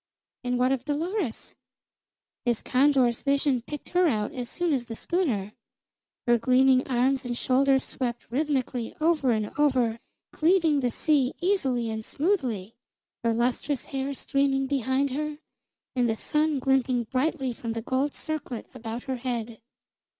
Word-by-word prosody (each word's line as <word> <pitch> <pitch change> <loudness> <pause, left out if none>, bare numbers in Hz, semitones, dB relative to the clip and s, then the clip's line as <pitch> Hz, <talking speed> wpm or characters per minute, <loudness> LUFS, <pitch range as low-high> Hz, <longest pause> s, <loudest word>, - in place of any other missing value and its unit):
And 245 0 0
what 250 +1 +3
of 265 -2 0
Dolores? 310 - -2 0.9
His 240 -4 0
condor's 255 -3 +3
vision 275 -2 +2
picked 295 +4 -8
her 360 0 +3
out 215 -7 0
as 245 -2 -4
soon 345 -3 0
as 250 -3 -1
the 230 -1 -6
schooner. 225 - -1 0.7
Her 240 -1 +4
gleaming 255 +2 +4
arms 260 +1 +2
and 240 -1 -3
shoulders 265 +1 +3
swept 240 -2 -4
rhythmically 260 -4 -1
over 310 -4 +2
and 215 -3 0
over, 250 -6 +2 0.3
cleaving 325 -3 +3
the 250 -2 +1
sea 275 +1 +1
easily 265 - +1
and 220 0 -4
smoothly, 250 - -1 0.5
her 230 - +2
lustrous 245 +4 0
hair 270 +1 -2
streaming 275 0 +1
behind 270 0 0
her, 300 +2 -3 0.6
and 245 -2 +2
the 220 - 0
sun 305 +2 +1
glinting 260 -2 +2
brightly 265 +2 -1
from 230 0 -5
the 230 - -3
gold 265 +4 0
circlet 305 -7 -4
around 235 -1 -6
her 260 -2 -3
head. 235 -2 -4
260 Hz, 145 wpm, -27 LUFS, 240-290 Hz, 0.9 s, Her